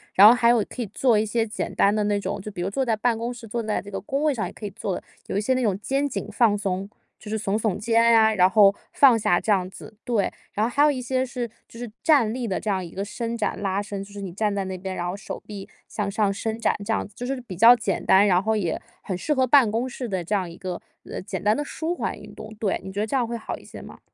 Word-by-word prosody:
然 200 +2 +10
后 225 - +9
还 240 -1 +3
有 235 -3 +3
可 250 - -6
以 220 - -3
做 230 +3 +2
一 - - +2
些 225 +1 0
简 215 - -4
单 200 - +4
的 210 0 +1
那 205 -1 +1
种， 200 0 -4
就 210 - -7
比 185 -3 -6
如 190 - -1
坐 265 +7 -1
在 230 -3 +1
办 230 +2 +1
公 235 +2 -3
室， 240 -2 -10
坐 235 +2 -2
在 215 -1 -1
这 205 - -10
个 195 - -4
工 275 +7 -2
位 305 -2 +3
上 225 -4 -3
也 - - -8
可 215 - -9
以 205 - -4
做 195 -1 -3
的。 - - -7 0.2
有 - - -2
一 - - +1
些 260 +5 +1
那 255 - 0
种 200 -4 0
肩 275 +6 0
颈 - - -4
放 230 -5 +3
松， 195 -1 -2 0.3
就 210 - -11
是 220 - -1
耸 200 0 0
耸 215 -4 -1
肩 230 +2 +2
啊， 225 -1 +5
然 185 -2 +5
后 200 0 +6 0.2
放 265 -5 +6
下 210 -5 +2
这 220 - -1
样 185 -3 +2
子。 215 - -12
对。 230 -5 0 0.2
然 210 - -1
后 - - -3
还 285 +4 +3
有 300 - +5
一 260 -3 -3
些 255 +1 0
是 245 -2 -4 0.2
就 230 - -13
是 240 -1 -5
站 275 -9 +4
立 245 0 -3
的 190 - -1
这 215 - -4
样 190 -2 0
一 170 - -10
个 195 - -4
伸 230 +2 -4
展 215 - -2
拉 195 0 0
伸， 200 -1 -5
就 200 - -14
是 200 0 -8
你 190 -3 -5
站 210 +2 0
在 200 -1 -2
那 190 0 -5
边， 190 +1 -5
然 175 - -3
后 180 - -3
手 200 - -7
臂 205 -2 -8 0.2
向 200 -2 -3
上 205 -1 +1
伸 220 +2 -3
展 - - +1
这 225 - 0
样 - - -1
子， 200 - -24
就 245 - -5
是 265 +1 -2
比 215 -7 -9
较 230 +7 +8
简 210 -5 -2
单， 195 +2 +6
然 185 -1 +3
后 220 +1 +1
也 180 -6 -1 0.2
很 185 -3 -4
适 300 +11 0
合 260 -2 +2
办 255 -4 +5
公 235 +4 -1
室 250 0 -5
的 190 -3 -2
这 210 - 0
样 190 -3 -1
一 170 - -12
个， 185 -2 -5 0.3
呃， - - -5
简 190 0 -5
单 210 +1 +3
的 295 - -2
舒 320 +4 -3
缓 - - -3
运 - - -12
动。 215 0 -9
对， 210 -3 -1
你 190 - -7
觉 200 - -4
得 215 - 0
这 245 - -2
样 250 -3 +2
会 235 0 -4
好 220 - -6
一 - - -16
些 - - -11
吗？ - - -12
215 Hz, 335 characters per minute, -24 LUFS, 195-235 Hz, 0.3 s, 然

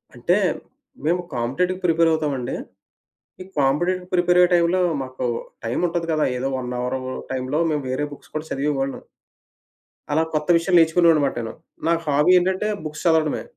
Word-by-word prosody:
అంటే, - - +1 0.7
మేము 175 +3 +2
కాంపిటెటివ్‌కి 175 +11 -1
ప్రిపేర్ 165 -1 +4
అవుతాామండి, 145 -6 -2 0.9
ఈ - - -9
కాంపిటెటివ్ 175 +7 +1
ప్రిపేర్ 175 0 +3
అయ్యే 180 0 +5
టైములో 175 +1 +3 0.2
మాకు 130 -1 -4 0.4
టైం 115 +1 -1
ఉంటది 165 0 -2
కదా! 155 -1 +2
ఏదో 130 +2 -1
1 125 -1 -5
అవరు 125 +1 -2 0.3
టైమ్లో 130 +3 -1
మేము 150 -2 -1
వేరే 130 +3 -1
బుక్స్ 145 - -13
కూడా 155 +1 -3
చదివేవాళ్ళం. 135 -1 -2 1.1
అలా 160 +2 +3
కొత్త 150 -1 -1
విషయాలు 175 +2 +2
నేర్చుకునేవాడనమాట 160 -3 +4
నేను. 115 -1 -6 0.4
నాకు 170 0 +2
హాబీ 150 +4 +4
ఏంటంటే 190 +3 0 0.2
బుక్స్ 150 0 -6
చదవడమే. 160 -2 +2
155 Hz, 145 wpm, -22 LUFS, 135-175 Hz, 1.1 s, అయ్యే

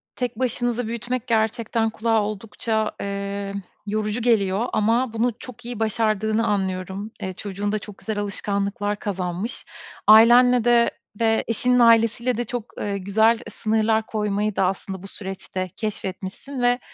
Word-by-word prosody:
Tek 245 -3 -3
başınıza 245 -1 0
büyütmek 240 +2 -3
gerçekten 225 0 +1
kulağa 225 0 +1
oldukça, 215 +1 -2
eee, 200 0 -3 0.3
yorucu 215 +2 -1
geliyor. 215 -2 +2
Ama 230 +3 +2
bunu 235 +2 +1
çok 245 -1 -11
iyi 240 -2 -5
başardığını 220 0 +1
anlıyorum. 190 +1 -2
Eee, 190 -2 -3
çocuğun 200 +2 -4
da 215 - 0
çok 205 -1 -11
güzel 220 -2 -4
alışkanlıklar 205 0 -2
kazanmış. 185 +2 -3 0.4
Ailenle 240 +3 +7
de 235 0 +4 0.3
ve 225 -1 +3
eşinin 250 +2 +2
ailesiyle 230 +1 +4
de 240 - 0
çok, 240 -1 -4
eee, 200 -1 -2
güzel 220 +4 +3
sınırlar 220 +1 +1
koymayı 210 -1 -1
da 190 - +2
aslında 190 0 -3
bu - - -7
süreçte 190 -1 -4
keşfetmişsin 210 +5 -5
ve 245 0 +3
220 Hz, 140 wpm, -23 LUFS, 200-235 Hz, 0.4 s, Ailenle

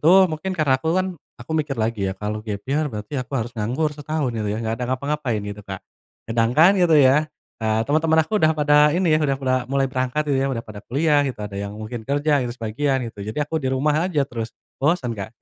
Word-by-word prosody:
itu 155 - +3 0.2
mungkin 185 +4 -3
karena 135 -5 +2
aku 160 - -2
kan 185 0 +2 0.3
aku 120 - -13
mikir 145 -3 -4
lagi 110 -3 -1
ya, 95 - -4
kalau 105 +2 -3
gap 105 -2 -5
year, 145 +4 0
berarti 105 0 -7
aku 125 - -9
harus 120 -1 -3
nganggur 125 +8 -1
setahun, 150 -2 -2
gitu 110 -2 -2
ya, 105 - -1
gak 110 - -1
ada - - 0
ngapa-ngapain, 130 -3 -1
gitu 105 0 -6
Kak. 95 -1 -8 0.4
Sedangkan, 120 - +4
gitu 170 -3 +5
ya, 145 +2 +5 0.3
eee, 110 0 +1
teman-teman 160 +3 +3
aku 210 +6 -1
udah 155 0 +4
pada 150 +1 +4
ini, 175 -3 +2
udah 140 -3 +1
pada 130 -1 0
mulai 135 0 +1
berangkat, 130 +2 -1
udah 135 -4 0
pada 105 -1 -9
kuliah 145 +3 +3
gitu, 125 - -5
ada 105 - -7
yang 100 +1 -5
mungkin 110 +2 -6
kerja 145 +1 +2
gitu, 120 -1 -3
sebagian, 125 +4 -1
gitu. 100 - -12
Jadi, 110 - -6
aku 160 +2 -2
di 130 - -1
rumah 150 +6 +1
aja 150 -6 +1
terus, 115 -4 -6 0.2
bosen 145 -4 +1
Kak. 110 +1 -7
135 Hz, 220 wpm, -22 LUFS, 115-150 Hz, 0.4 s, gitu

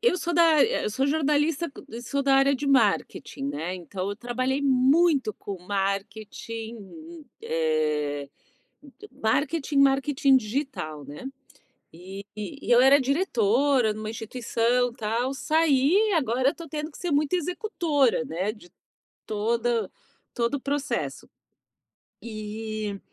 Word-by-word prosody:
eu 470 -5 +3
sou 345 -1 -2
da 340 - +5
a - - +6
eu 465 - -1
sou 265 +5 0
jornalista, 300 +1 +1 0.2
g 235 +2 -8
sou 280 +3 -2
da 275 0 +3
área 275 +1 +4
de 285 +2 -4
marketing, 230 - +1
né. 155 +6 -3
Então 185 +2 -5
eu 205 - -5
trabalhei 255 +4 -2
muito 270 -1 +3
com 200 -2 -7
marketing, 220 - -5 0.2
eh, 150 -3 -1 0.5
m 285 - -16 0.4
marketing 285 +1 0
marketing 275 0 +4
digital, 215 - -4
né. 145 - -9 0.7
E 190 +4 -9
e 260 +7 -5
eu 240 - +7
era 275 +2 +7
diretora 260 - +2
numa 215 0 -6
instituição, 235 +1 0
tal, 235 +4 -2
saí, 320 +7 +3
agora 260 -3 +2
eu - - -2
estou 335 -1 -10
tendo 305 +2 -4
que - - -13
ser 355 -3 -3
muito 290 +2 +1
executora, 335 - +1
né, 190 -1 -2
de 210 -5 -16 0.6
toda 230 0 0 0.4
todo 235 +3 0
o 280 - -2
processo. 285 +1 -3 0.9
E 215 -2 -5
250 Hz, 130 wpm, -26 LUFS, 210-285 Hz, 0.9 s, eu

